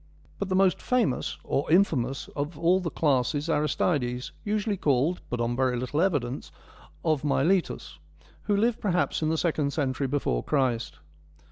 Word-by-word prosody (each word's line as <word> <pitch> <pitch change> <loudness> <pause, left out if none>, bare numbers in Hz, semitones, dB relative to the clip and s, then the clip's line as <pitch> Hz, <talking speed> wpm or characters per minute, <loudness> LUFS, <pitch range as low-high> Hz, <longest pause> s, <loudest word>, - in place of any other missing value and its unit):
But 200 - -2
the 185 - +1
most 190 -1 +3
famous, 245 - 0
or 140 - -1
infamous, 140 -8 +2
of 145 +2 -3
all 170 +4 +3
the 175 -3 -3
class 140 -3 +1
is 150 +3 -1
Aristides, 140 -4 0
usually 210 0 0
called, 150 0 +1
but 120 - -3
on 120 +1 0
very 130 -1 +1
little 130 +6 -1
evidence, 145 -9 -1 0.5
1 160 - +3
of 150 - -4
Miletus,' 140 - 0 0.5
who 205 -1 +2
lived 230 +2 +1
perhaps 180 -5 0
in 155 - +1
the 160 - +1
second 150 -4 0
century 135 -2 -1
before 130 - -1
Christ. 130 -5 0
150 Hz, 160 wpm, -27 LUFS, 130-180 Hz, 0.5 s, most